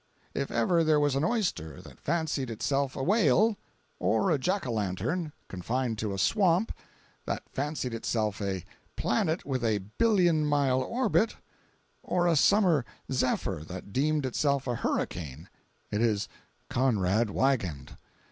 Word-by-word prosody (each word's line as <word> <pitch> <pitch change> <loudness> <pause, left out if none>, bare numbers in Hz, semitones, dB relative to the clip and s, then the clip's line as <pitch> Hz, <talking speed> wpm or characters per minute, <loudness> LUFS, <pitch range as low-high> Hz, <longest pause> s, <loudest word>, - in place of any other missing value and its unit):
If 140 - -2
ever 165 +9 +2
there 155 -1 +4
was 145 -2 +2
an 140 - +1
oyster 170 - -1
that 75 -6 -14
fancied 155 -5 -1
itself 135 +4 -1
a 135 - -3
whale; 205 - +4 0.4
or 195 - +2
a 150 - +2
jack 190 +8 0
o'lantern, 120 - -2 0.2
confined 115 +5 -2
to 105 -2 -2
a 95 - -3
swamp, 190 - +2 0.6
that - - -2
fancied 140 -3 -2
itself 110 -2 -1
a 95 -3 -2 0.3
planet 160 +2 0
with 130 -3 -2
a 110 -2 +2 0.2
billion 180 -9 +4
mile 140 -3 +2
orbit; 230 - +1 0.7
or 175 -1 0
a 170 -1 +3
summer 175 - +4 0.3
zephyr 115 - 0
that 95 +2 -8
deemed 150 +1 +1
itself 140 +1 0
a 125 - -1
hurricane, 80 - -3 0.4
it 105 - 0
is 110 -4 +1 0.4
Conrad 110 -3 +1
Wiegand. 100 - -1
135 Hz, 140 wpm, -29 LUFS, 110-165 Hz, 0.7 s, there